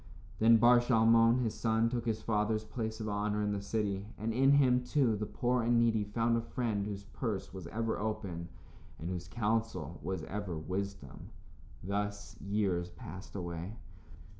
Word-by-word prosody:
Then 115 +1 +7
Bar 120 +1 +7
Shalmon, 115 0 +5
his 110 - -1
son, 110 0 +1
took 120 0 -2
his 110 -1 -1
father's 110 0 +1
place 110 0 -4
of 110 - -3
honor 105 0 0
in 105 - 0
the 100 -1 -2
city, 100 -1 -2
and 110 +1 -2
in 135 +4 +5
him, 125 -3 +4
too, 125 -3 +2
the 105 0 -3
poor 125 +3 0
and 120 +1 +3
needy 115 -2 +3
found 115 +3 +1
a 115 - +1
friend 115 -4 -2
whose 100 -1 -5
purse 100 -3 -4
was 95 -3 -7
ever 115 0 -2
open 95 -5 -3 0.5
and 80 - -5
whose 90 -1 -4
counsel 110 - -1
was 95 -4 -3
ever 100 -2 -4
wisdom. 90 -4 -5 0.5
Thus 100 +2 -3
years 100 -4 0
passed 90 +3 -10
away. 85 +3 -5
105 Hz, 165 wpm, -32 LUFS, 100-115 Hz, 0.5 s, Then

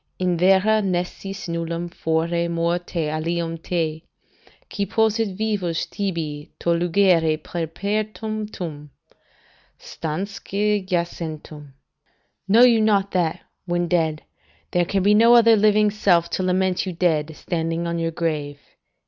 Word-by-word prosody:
"'In 180 -1 0
vera 190 +5 +4
nescis 195 +1 -3
nullum 170 0 -3
fore 170 +1 -1
morte 170 -1 -1
alium 165 +2 -2
te, 160 -2 -2 0.7
Qui 200 - -3
possit 220 -2 +1
vivus 200 -6 -1
tibi 165 -6 -4
to - - -3
lugere 170 -2 +3
peremptum, 200 -1 -4 0.9
Stansque 200 +5 -3
jacentem.' 160 -5 -4 0.7
["Know 225 +5 +6
you 235 -3 +6
not 200 -2 +2
that, 175 -1 0 0.3
when 175 0 0
dead, 160 -3 0 0.5
there 175 -1 +2
can 195 +2 0
be 205 +2 +5
no 230 +3 +6
other 230 -1 +7
living 210 0 +3
self 180 -5 +2
to - - -1
lament 185 0 0
you 185 - -3
dead, 160 -3 0
standing 165 0 -2
on 170 0 -2
your 165 0 0
grave." 150 -4 -3
175 Hz, 120 wpm, -22 LUFS, 165-200 Hz, 0.9 s, other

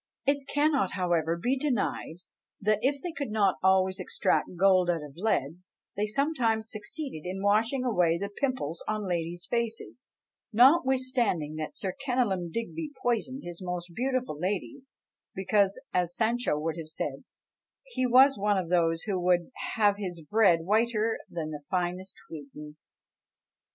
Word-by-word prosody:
It 280 0 +1
cannot, 290 -1 +2
however, 170 -3 0
be 245 +10 +1
denied, 245 - -2 0.4
that 210 +1 +2
if 275 +1 0
they 355 - -3
could 285 -6 -4
not 205 -3 +2
always 190 0 +3
extract 470 +2 0
gold 185 -2 +5
out 165 -3 0
of 145 -2 -10
lead, 170 -6 0 0.4
they 210 +1 0
sometimes 230 -4 0
succeeded 215 - -5
in 195 +1 -4
washing 225 +6 +2
away 175 -8 +2
the 200 +3 -4
pimples 255 - -2
on 215 -2 -2
ladies' 175 0 -2
faces, 235 +2 -3 0.4
notwithstanding 255 - +3
that 155 -1 -5
Sir 190 -2 -3
Kenelm 230 -10 0
Digby 295 - -4
poisoned 245 +3 0
his 175 +1 -7
most 180 -1 -4
beautiful 255 - -1
lady, 200 - -3 0.5
because, 195 +1 +2
as 175 -1 0
Sancho 235 -6 +1
would 160 +2 -2
have 155 -1 -7
said, - - -4 0.6
he 475 - -1
was 260 +1 +6
one 205 0 +2
of 180 -3 -2
those 165 -2 +2
who 195 -4 -1
would 175 +3 +1 0.2
"have 205 -3 +3
his 180 -4 -4
bread 180 0 +3
whiter 220 +3 +1
than 155 -2 -4
the 150 -1 -7
finest 180 +1 -2
wheaten." 150 -1 -10
200 Hz, 145 wpm, -28 LUFS, 175-245 Hz, 0.6 s, was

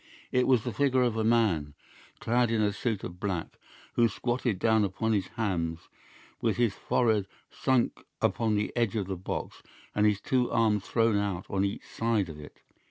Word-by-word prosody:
It 125 0 +2
was 125 -4 +4
the 120 - -3
figure 130 -3 +2
of 120 -3 +1
a 110 - 0
man, 105 -11 +2 0.4
clad 120 +1 +2
in 115 -1 +1
a 105 -1 +2
suit 110 -1 -2
of 90 0 -7
black, 95 -5 -3 0.3
who 120 - +4
squatted 120 0 -1
down 110 +2 +3
upon 110 +3 0
his 100 -3 0
hams 85 -7 -1 0.6
with - - +1
his 120 -4 +2
forehead 110 -2 +1 0.2
sunk 130 -2 0 0.2
upon 110 -2 +1
the 105 0 -1
edge 115 -4 +1
of 105 -3 0
the 95 0 -3
box 90 - -5 0.3
and 105 0 +3
his 105 -1 +2
two 125 +2 +1
arms 105 -3 +2
thrown 115 -2 +2
out 100 -3 -2
on 95 0 +1
each 100 0 -3
side 115 -5 0
of 75 -1 -9
it. 75 - -13
110 Hz, 185 wpm, -29 LUFS, 95-115 Hz, 0.6 s, was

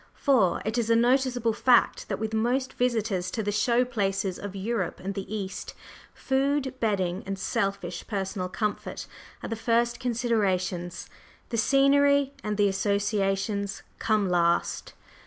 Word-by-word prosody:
For 240 -10 +2
it 220 +3 0
is 230 -1 -1
a 230 - +5
noticeable 245 -1 +2
fact 245 +1 +3
that - - -1
with 220 +1 -4
most 245 +4 0
visitors 220 -7 0
to 220 +3 -3
the 205 - -1
"show" 235 +4 +2
places 195 -5 -1
of 200 -1 -6
Europe 200 -1 -2
and 195 +2 -4
the 195 +1 -6
East, 195 -3 -5 0.4
food, 270 0 0
bedding 190 -5 0
and 195 0 -3
selfish 190 -2 -2
personal 190 -2 -3
comfort 210 +2 -3 0.4
are - - -4
the 225 - -2
first 235 +1 +1
considerations, 200 -8 -1 0.4
the 230 - -2
scenery 280 +2 +4
and 210 -1 -2
the 205 -1 +4
associations 200 0 -1 0.2
come 215 -3 +1
last. 170 -1 +1
215 Hz, 140 wpm, -27 LUFS, 195-240 Hz, 0.4 s, a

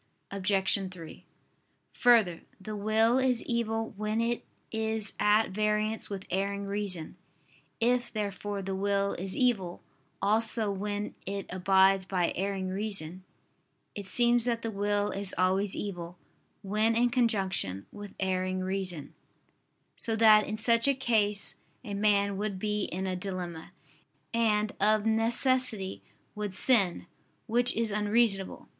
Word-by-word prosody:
Obj. 195 0 +2
3: 170 -4 -11 0.7
Further, 220 -9 +4 0.2
the 215 +2 -6
will 220 +4 +2
is 255 -2 +1
evil 225 -1 -2
when 215 +2 -2
it 235 +1 -1 0.3
is 220 -1 -2
at 210 +1 +3
variance 215 +2 0
with 195 -2 -6
erring 200 +2 -1
reason. 200 -5 -3 0.6
If, 245 +1 +1
therefore, 205 -1 -4
the 195 +1 -3
will 200 +1 0
is 185 +1 -5
evil 210 -9 0 0.4
also 220 +1 +1
when 205 +1 -3
it 195 0 -3
abides 190 +1 +3
by 180 -3 0
erring 190 0 -2
reason, 190 -3 -4 0.7
it 200 -2 -7
seems 240 +3 +4
that 235 -1 -1
the 225 - -2
will 205 0 0
is 200 -1 -4
always 190 +2 +1
evil 175 -3 -6 0.5
when 215 +3 +1
in 240 +1 +2
conjunction 195 - 0
with 205 -1 -10
erring 185 0 -1
reason: 185 -5 -4 0.8
so 225 - -1
that 215 -1 +6
in 215 - -3
such 230 +2 +2
a 275 - +3
case 215 -6 0 0.3
a 210 -5 -6
man 200 -1 +2
would 205 -1 -3
be 210 +1 -1
in 185 +2 -4
a 185 -1 -2
dilemma, 180 -3 -6 0.6
and, 215 -2 +2
of 215 +1 +3
necessity, 225 -2 +2 0.3
would 210 -3 -4
sin: 200 -7 +4 0.4
which 240 +2 +1
is 225 -1 0
unreasonable. 210 -1 0
205 Hz, 130 wpm, -29 LUFS, 190-225 Hz, 0.8 s, that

